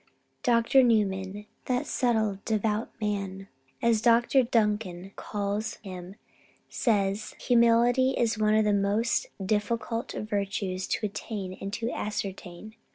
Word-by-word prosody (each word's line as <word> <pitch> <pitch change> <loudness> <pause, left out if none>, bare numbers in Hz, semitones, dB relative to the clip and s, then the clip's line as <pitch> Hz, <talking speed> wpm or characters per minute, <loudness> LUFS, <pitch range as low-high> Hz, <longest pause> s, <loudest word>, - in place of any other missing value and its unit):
Dr. 240 0 +4
Newman, 205 -4 +1 0.2
"that 250 -1 0
subtle, 220 -5 0
devout 215 0 0
man," 195 -2 -3 0.3
as 230 -2 +3
Dr. 240 +3 +4
Duncan 210 -6 0
calls 205 +1 -3
him, 185 -1 -8 0.5
says 205 -2 0
that - - -17
"humility 240 +2 +4
is 235 -1 +2
one 215 0 +2
of 220 0 +3
the 210 - +3
most 205 +4 +1 0.2
difficult 225 +3 -1
of 215 - -4
virtues 195 -2 -2
both - - -1
to - - -1
attain 200 -2 -5
and 195 - -4
to 230 +2 -2
ascertain. 200 -1 -5
215 Hz, 130 wpm, -28 LUFS, 200-230 Hz, 0.5 s, Dr